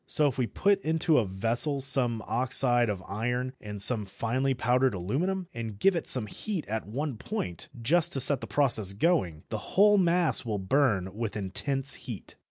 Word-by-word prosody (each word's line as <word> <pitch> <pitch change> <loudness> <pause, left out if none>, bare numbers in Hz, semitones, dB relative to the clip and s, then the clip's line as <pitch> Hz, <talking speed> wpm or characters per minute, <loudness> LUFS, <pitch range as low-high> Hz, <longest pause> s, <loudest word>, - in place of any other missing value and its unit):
So 150 - +1
if 130 -2 -4
we 125 - 0
put 200 - +1
into 160 -1 +1
a 115 - 0
vessel 115 +9 0
some 125 -5 -1
oxide 120 -1 +2
of 95 -3 -4
iron 120 +5 -3
and 105 -1 -8
some 105 +1 +3
finely 125 +7 -2
powdered 125 -1 +1
aluminium, 170 - -2
and 115 -3 -6
give 195 - +2
it 170 - -4
some 125 -4 +6
heat 180 - -5
at 110 0 -4
one 135 +3 -4
point, 95 - -5
just 165 +8 +3
to 135 - -2
set 135 0 +6
the - - -7
process 110 -9 +2
going, 100 - 0
the 110 - -4 0.2
whole 205 +1 +5
mass 175 -2 +2
will 110 -4 -3
burn 95 -3 0
with 110 -1 -4
intense 135 +8 -2
heat. 115 -7 -9
125 Hz, 180 wpm, -27 LUFS, 105-145 Hz, 0.2 s, some